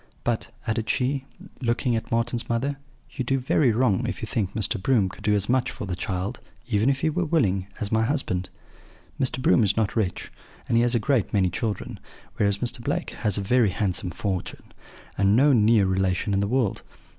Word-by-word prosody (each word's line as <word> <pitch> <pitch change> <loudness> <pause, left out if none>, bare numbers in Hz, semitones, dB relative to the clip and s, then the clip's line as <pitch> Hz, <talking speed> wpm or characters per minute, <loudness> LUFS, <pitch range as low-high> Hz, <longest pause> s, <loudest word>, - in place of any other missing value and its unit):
But,' 120 -2 -1 0.2
added 110 -1 -2
she, 135 +1 0 0.4
looking 120 0 0
at 115 - -3
Marten's 115 +1 0
mother, 135 +4 -1 0.3
'you 130 - -3
do 135 +2 +1
very 130 0 +2
wrong 110 -4 +1
if - - -4
you - - -4
think 100 -3 -2
Mr. 105 -1 0
Broom 105 -4 +2
could 95 - -12
do 105 -1 +3
as 100 -1 +2
much 130 0 +1
for - - -6
the 95 -2 -3
child 95 0 -3 0.3
(even 110 +1 +2
if 135 -1 0
he 160 - +2
were 180 +4 0
willing) 100 - +1
as 105 - -3
my 110 0 +3
husband. 110 -9 -1 0.7
Mr. 130 0 0
Broom 130 -2 +4
is 100 +1 +1
not 110 -2 0
rich, 100 -6 -2 0.4
and - - +1
he 115 - +5
has 120 +1 +2
a - - +3
great 115 -1 +1
many 95 -3 +2
children; 105 -4 -3 0.4
whereas 100 -1 +2
Mr. 120 +1 0
Blake - - -2
has 105 -3 -1
a - - -1
very 115 +2 +3
handsome 95 -1 -1
fortune, 95 +1 -4 0.5
and 100 +1 +4
no 140 +4 +5
near 110 -3 +4
relation 95 +2 0
in 95 - +2
the 100 - 0
world. 120 -2 0
110 Hz, 205 wpm, -25 LUFS, 100-125 Hz, 0.7 s, he